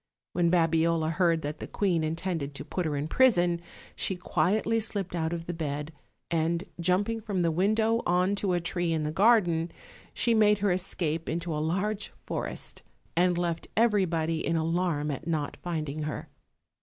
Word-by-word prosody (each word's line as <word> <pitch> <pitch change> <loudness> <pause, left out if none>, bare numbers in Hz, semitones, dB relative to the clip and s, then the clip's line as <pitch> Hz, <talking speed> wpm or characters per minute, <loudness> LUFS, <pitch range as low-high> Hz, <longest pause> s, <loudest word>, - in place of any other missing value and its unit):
When 175 -1 +2
Babiola 165 -1 +2
heard 165 -1 +2
that 150 +2 -4
the - - -6
queen 180 -6 +1
intended 160 -3 -2
to - - -6
put 180 -3 -2
her 150 - -1
in 145 +2 -2
prison, 175 -7 +3 0.3
she 190 - 0
quietly 215 +5 +1
slipped 200 -4 -3
out 160 -2 -1
of 170 -1 -4
the 175 - -3
bed, 150 -1 -4 0.4
and 165 +1 +1 0.2
jumping 200 +6 +1
from 200 -5 -1
the 165 - +2
window 215 +6 +2
on 180 +3 +3
to 195 -2 0
a 175 - +2
tree 170 0 -1
in 160 -1 0
the 150 - -1
garden, 175 -4 +3 0.4
she 235 - +2
made 210 -1 +5
her 205 -1 +1
escape 170 -3 -2
into 170 +1 -2
a 150 - -1
large 195 +6 -1
forest, - - -4 0.3
and 175 +1 +3
left 170 -1 -2
everybody 175 -8 +2
in 165 - 0
alarm 165 -2 0
at 150 +4 -6
not 155 -4 -1
finding 155 -4 -3
her. 150 0 -4
170 Hz, 170 wpm, -28 LUFS, 160-190 Hz, 0.4 s, made